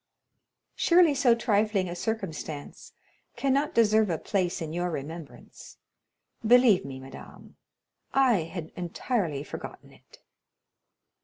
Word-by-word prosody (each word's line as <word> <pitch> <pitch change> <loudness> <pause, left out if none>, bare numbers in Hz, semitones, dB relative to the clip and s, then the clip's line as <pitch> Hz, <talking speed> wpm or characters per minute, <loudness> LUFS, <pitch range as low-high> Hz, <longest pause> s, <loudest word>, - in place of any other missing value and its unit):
"Surely 340 -3 +4
so 255 -4 +4
trifling 210 -4 +1
a 175 - -5
circumstance 160 -8 -5 0.4
cannot 275 +2 0
deserve 220 -2 +4
a 165 - 0
place 180 +1 -1
in 160 -1 -5
your 175 +1 -1
remembrance. 160 0 -9 0.7
Believe 235 -3 +5
me, 135 -1 -8
madame, 135 0 -13 0.6
I 245 -11 +3
had 165 -1 -7
entirely 175 - -2
forgotten - - -9
it." - - -20
195 Hz, 105 wpm, -27 LUFS, 160-235 Hz, 0.7 s, Believe